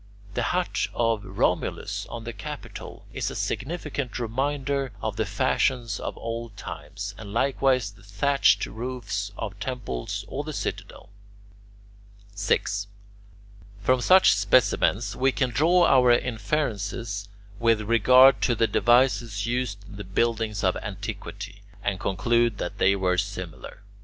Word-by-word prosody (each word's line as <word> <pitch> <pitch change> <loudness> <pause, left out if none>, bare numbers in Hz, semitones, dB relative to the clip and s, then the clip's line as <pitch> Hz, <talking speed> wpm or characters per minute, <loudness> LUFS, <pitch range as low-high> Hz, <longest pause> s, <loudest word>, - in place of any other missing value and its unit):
The - - -1
hut - - 0
of 115 -3 +1
Romulus - - -1
on 115 -1 -7
the 120 +1 -6
Capitol 100 - -8
is - - -2
a - - -7
significant 140 -5 -3
reminder 135 +2 -1
of 110 0 -3
the 110 -1 -1
fashions 120 +1 0
of - - -5
old 115 -2 -5
times, 100 +1 -7
and 105 -2 -8
likewise 130 -2 +2
the 105 +2 -19
thatched 120 +8 +2
roofs 110 -4 -4
of 105 -2 -5
temples 100 - -4
or - - -4
the - - -6
Citadel. - - -5 1.2
6. 100 0 0 1.0
From 130 +4 +3
such 185 +7 +6
specimens 105 +1 +2
we 135 +1 +2
can 130 -1 0
draw 170 +7 +4
our 125 -2 +5
inferences 110 -4 -1 0.3
with 115 -2 +3
regard 125 +5 +6
to 120 - +2
the 115 - +3
devices 115 -2 +2
used 120 -4 -2
in 100 - -11
the 100 - -6
buildings 110 +2 -1
of 95 -1 +2
antiquity, 100 0 -7 0.2
and 100 -2 -1
conclude 115 +4 +1
that 95 +2 -5
they 100 +1 +4
were 90 -2 +1
similar. 100 -1 -6
115 Hz, 130 wpm, -26 LUFS, 100-125 Hz, 1.2 s, such